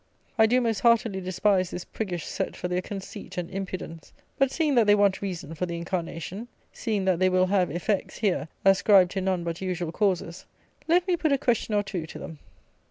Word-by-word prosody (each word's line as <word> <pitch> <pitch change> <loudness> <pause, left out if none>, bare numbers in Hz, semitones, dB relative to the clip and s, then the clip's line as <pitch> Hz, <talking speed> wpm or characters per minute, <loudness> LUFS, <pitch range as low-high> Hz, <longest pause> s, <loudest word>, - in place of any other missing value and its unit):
I 220 -1 +5
do 250 +3 +3
most 225 -3 0
heartily 230 -5 +3
despise 185 0 +1
this 180 - -6
priggish 180 -7 -4
set - - -3
for - - -4
their 180 0 -1
conceit 195 +1 -8
and 180 +1 -3
impudence; 185 -4 -6 0.3
but, 275 -1 +4
seeing 305 0 0
that 235 -4 +4
they 205 - +7
want 200 -2 +2
reason 175 -6 -5
for 180 +3 -3
the 170 0 -4
incarnation; 175 +4 -4 0.3
seeing 210 -5 -2
that 185 -3 +2
they 185 0 +4
will 185 0 +3
have 185 -1 +2
effects, 180 +6 -2
here, 195 -7 0 0.2
ascribed 195 -1 +5
to 195 - -2
none 185 -2 0
but 170 +1 -4
usual 180 -3 -2
causes, 185 -3 -1 0.4
let 350 +3 +3
me 360 - +3
put 320 -3 0
a 275 - +4
question 230 -4 0
or 205 - +2
two 180 -5 -5
to - - -9
them. 160 -3 -9
190 Hz, 205 wpm, -26 LUFS, 180-215 Hz, 0.4 s, they